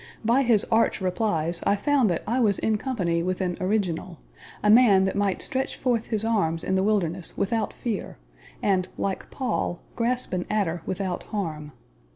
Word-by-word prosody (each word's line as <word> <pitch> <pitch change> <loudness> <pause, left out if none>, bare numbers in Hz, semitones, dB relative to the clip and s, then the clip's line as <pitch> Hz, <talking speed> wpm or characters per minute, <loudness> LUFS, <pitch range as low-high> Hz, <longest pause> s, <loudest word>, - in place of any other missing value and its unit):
By 240 +4 +4
his 235 -5 +3
arch 225 +1 +3
replies 180 -3 0
I 200 - +3
found 265 +1 +2
that 170 - -1
I 235 +5 0
was 210 -5 +3
in 220 - +1
company 180 -11 -1
with 185 +1 -2
an 180 -2 -1
original 185 -3 -1 0.5
a 210 - +3
man 215 -5 +6
that 190 - -1
might 200 -2 0
stretch 265 0 -2
forth 240 -3 0
his 220 -1 -1
arms 165 -8 0
in 190 - -1
the 190 - +3
wilderness 190 -4 0
without 220 +2 0
fear, 225 -5 -4 0.5
and 185 -3 +2
like 195 -1 -3
Paul, 245 -9 -2 0.2
grasp 245 0 -1
an 180 -1 -2
adder 185 -6 0
without 185 -1 -2
harm. 155 -8 -4
200 Hz, 175 wpm, -25 LUFS, 180-225 Hz, 0.5 s, man